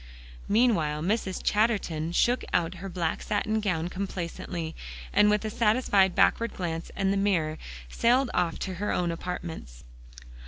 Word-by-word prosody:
Meanwhile 170 -10 +2
Mrs. 190 -1 -1
Chatterton 200 -8 +1
shook 240 +8 +2
out 170 +1 +1
her 195 - -5
black 170 -3 -2
satin 215 +1 0
gown 180 -6 -1
complacently, 175 -3 -5 0.4
and 210 - +5
with 210 +1 +1
a 215 - -2
satisfied 210 -5 +3
backward 220 +3 +2
glance 165 -2 -4
at 195 0 +1
the 200 - +1
mirror, 170 -6 +1 0.3
sailed 245 - +2
off 175 -2 0
to 190 - -3
her 210 - 0
own 175 -1 0
apartments. 165 - -6
190 Hz, 145 wpm, -27 LUFS, 170-210 Hz, 0.4 s, and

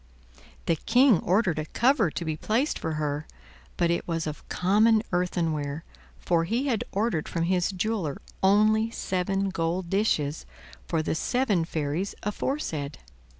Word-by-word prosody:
The 165 - +1
King 250 - +4
ordered 185 -4 +1
a 155 - -2
cover 240 - +3
to 170 - -5
be 160 -1 -1
placed 230 - 0
for 160 - -3
her, 150 -1 -2 0.5
but 170 -1 +2
it 170 - -1
was 165 -1 -1
of 155 -1 -7
common 215 +4 +3
earthenware, 165 -4 -1 0.3
for 165 -1 +1
he 235 +9 0
had 245 -6 0
ordered 200 -6 -1
from 165 - -1
his 180 0 +1
jeweler 190 -6 -2 0.2
only 215 +3 +4
seven 195 -2 -1
gold 170 0 -2
dishes, 155 - 0 0.4
for 160 - 0
the - - -1
seven 210 -1 +1
fairies 160 +4 -2
aforesaid. 195 - -3
180 Hz, 145 wpm, -27 LUFS, 160-215 Hz, 0.5 s, King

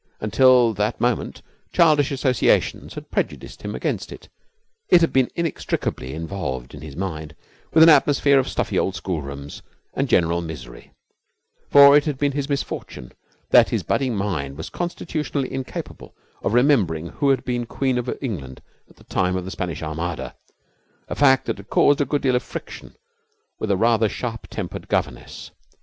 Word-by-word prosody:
Until 120 +2 +4
that 105 +1 -1
moment 120 -2 -1 0.3
childish 155 -4 +4
associations 130 -2 +1
had - - -9
prejudiced - - -3
him - - -5
against - - -3
it. - - -12 0.6
It 180 - +7
had 165 - +2
been 130 -2 +3
inextricably 145 - -3
involved 80 -7 -5
in - - -10
his 75 -3 -9
mind 80 -5 -5 0.4
with 160 - +7
an 165 - +8
atmosphere 145 -2 +5
of 130 - -1
stuffy - - -2 0.2
schoolrooms 70 -6 -6 0.3
and - - -1
general 85 0 +2
misery, 65 -8 -9 0.8
for 140 0 +8
it 145 - +4
had 150 -4 -2
been 145 +1 +1
his 140 0 -3
misfortune 140 - -4 0.4
that - - +6
his - - -1
budding 130 -4 0
mind 80 -9 -3
was 80 - -7
constitutionally 155 -5 -3
incapable 135 -1 -7 0.3
of 105 - -1
remembering 100 - +2
who 140 -2 0
had 135 -2 +1
been 120 -1 -2
Queen 130 -1 -1
of 125 +1 -4
England 70 - -5 0.3
at - - -21
the - - -20
time 90 0 0
of 90 -1 -3
the 95 - -6
Spanish 85 -6 -4
Armada 80 +2 -4 0.7
a - - -2
fact 135 -2 +4
that 115 - -2
had 100 +1 -13
caused 145 0 +4
a - - +2
good 145 0 -1
deal 130 -2 +2
of 125 - +1
friction - - -9 0.6
with 110 - -3
a 100 - +2
rather 110 0 +3
sharp 115 0 -5
tempered - - -6
governess. - - -3
115 Hz, 165 wpm, -22 LUFS, 85-140 Hz, 0.8 s, an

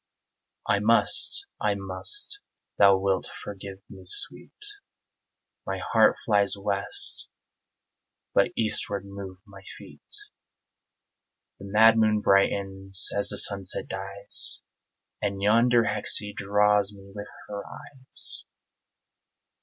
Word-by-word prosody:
I - - +2
must 400 - +6 0.2
I 105 -1 0
must! 100 - -3 0.4
Thou 100 -1 +6
wilt 95 -1 -1
forgive 100 -1 -9
me, 95 -2 -13
sweet; - - -1 1.1
My - - -4 0.2
heart - - +5
flies 100 -2 +3
west 100 -2 -3 1.0
but - - +3
eastward 105 -3 -1
move 100 -1 -9
my 100 -2 -15 0.2
feet; - - -16 1.5
The 100 - -10
mad 110 +3 +5
moon 110 -1 +2
brightens 95 -1 +1
as 100 - 0
the - - -2
sunset 100 -2 -1
dies, 100 +1 -2 0.6
And 100 -1 -2
yonder 115 +4 +3
hexie 105 -1 -2
draws 105 0 +1
me 100 0 -15
with 105 0 -8 0.2
her 100 -1 -6
eyes. 130 -2 -6
100 Hz, 105 wpm, -26 LUFS, 100-105 Hz, 1.5 s, must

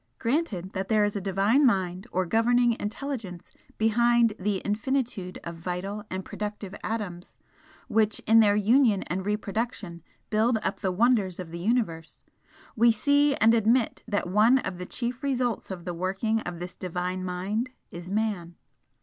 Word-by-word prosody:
Granted 230 - -1
that 190 0 -3
there 215 -2 +3
is 205 0 0
a 200 - -2
Divine 200 +8 +2
Mind 190 -4 +1
or 185 +1 0
Governing 235 +5 +3
Intelligence 210 -5 -5 0.3
behind 235 +1 +3
the 200 +1 0
infinitude 215 -3 -2
of 170 0 -7
vital 185 +5 -4
and 185 0 -4
productive 210 -2 -6
atoms 200 -6 -5 0.5
which 215 -1 +2
in 225 +1 +5
their 205 -2 +5
union 215 0 +3
and 185 +2 -3
reproduction 210 -4 -3 0.3
build 220 +2 +3
up - - -2
the 190 -3 -1
wonders 205 -3 +2
of 175 -3 -7
the 170 - -6
Universe, 175 -6 -1 0.5
we 235 +1 +5
see 285 +5 +3
and 225 +1 +4
admit 230 +1 +2
that 205 -5 -1
one 215 +7 +5
of 190 -8 -4
the 180 - -6
chief 245 0 -4
results 250 -5 -1
of 180 -3 -7
the 175 - -3
working 195 +6 -1
of 175 -5 -6
this 175 +1 -6
Divine 180 +1 -3
Mind 190 +7 -2 0.2
is 175 +1 -8
Man. 200 -5 -2
210 Hz, 160 wpm, -27 LUFS, 185-230 Hz, 0.5 s, in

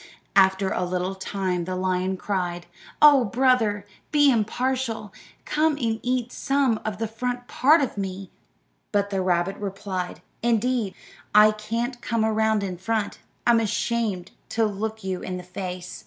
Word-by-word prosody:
After 190 0 +4
a - - 0
little 180 +1 -1
time 190 -2 -2
the 185 +1 -3
lion 185 0 0
cried, 180 -3 -2 0.4
"Oh, 285 -4 +8
brother, 225 -3 +2 0.3
be 290 -2 +5
impartial; 230 -1 -1 0.3
come 310 +1 +2
and 230 -6 -1
eat 245 -1 -1
some 270 -5 +1
of 215 -2 -3
the 225 - -2
front 245 +2 -4
part 300 +5 +4
of 250 -6 -2
me." 190 0 -5 0.6
But 200 -1 +1
the 195 -1 0
rabbit 180 +1 +1
replied, 195 -2 -4 0.2
"Indeed, 235 -2 +1 0.4
I 210 0 +8
can't 230 +4 -3
come 230 -2 0
around 220 -1 +2
in 185 -2 -4
front; 215 +1 -2 0.3
I'm 235 -1 +5
ashamed 215 -4 -1 0.2
to 225 0 +1
look 220 +1 -3
you 190 -1 -3
in 185 -1 -4
the 180 - -7
face." 180 0 -6
215 Hz, 150 wpm, -25 LUFS, 190-235 Hz, 0.6 s, Oh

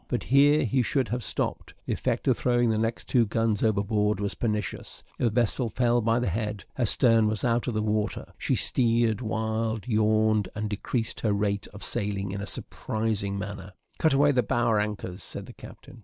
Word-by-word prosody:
But 120 - -2
here 145 +3 +4
he 125 +3 +2
should 130 -1 0
have 120 +1 -2
stopped; - - -3
the - - -1
effect - - -2
of - - +4
throwing 120 -2 +2
the 110 - 0
next 115 +1 -2
two 120 - +4
guns 110 -1 0
overboard 105 -1 +1
was 100 -1 -2
pernicious. 105 -4 -3 0.2
The 120 - +2
vessel 120 +2 +1
fell 120 +1 +2
by 115 +1 +2
the 120 - -1
head; 105 +1 -3
her 125 -3 0
stern 115 -1 +4
was 105 +1 -1
out 120 0 +1
of 120 - -2
the 110 - 0
water; 105 0 -2
she - - 0
steered 115 -2 +1
wild, 110 0 -2
yawed, 110 -2 +2
and 105 0 -3
decreased 110 +3 -3
in - - +2
her 105 - +2
rate 100 0 -1
of 100 - -11
sailing 100 -2 -2
in 100 +1 -4
a 100 - -5
surprising 105 -3 -2
manner. 100 -1 -6 0.3
"Cut 160 - +3
away 145 +1 +5
the 130 -3 +3
bower 115 -3 +1
anchors," 105 -3 -4
said - - -6
the - - -11
captain. 120 - -13
110 Hz, 200 wpm, -27 LUFS, 105-120 Hz, 0.3 s, away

